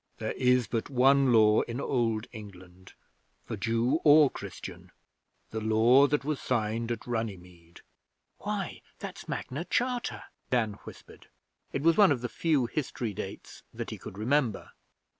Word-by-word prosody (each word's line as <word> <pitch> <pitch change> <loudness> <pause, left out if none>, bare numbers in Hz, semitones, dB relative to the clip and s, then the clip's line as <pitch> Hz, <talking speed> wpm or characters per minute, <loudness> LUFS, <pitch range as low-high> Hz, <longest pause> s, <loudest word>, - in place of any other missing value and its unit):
'There - - -3
is 125 -1 +2
but 115 -1 -3
one 135 0 +4
Law 110 -2 +5
in 120 +2 -4
Old 115 -5 0
England 95 -4 -12 0.5
for - - -4
Jew 115 +6 +1
or 150 -1 +7
Christian 100 -4 -9 0.6
the 110 - -3
Law 115 +6 +5
that 145 -1 -1
was 150 -2 -2
signed 115 -1 -1
at 115 - -4
Runnymede.' 90 -8 -6 0.6
'Why, - - -4 0.2
that's - - -8
Magna 140 +6 -4
Charta!' 245 +5 -1 0.3
Dan 115 -4 +1
whispered. - - -13 0.4
It 135 - -3
was 165 0 +4
one 200 -6 +7
of 130 -4 0
the 120 - -3
few 155 -7 +1
history 120 -4 -3
dates - - -8
that - - -5
he - - -7
could 95 - -10
remember. 120 0 0
120 Hz, 145 wpm, -29 LUFS, 110-140 Hz, 0.6 s, or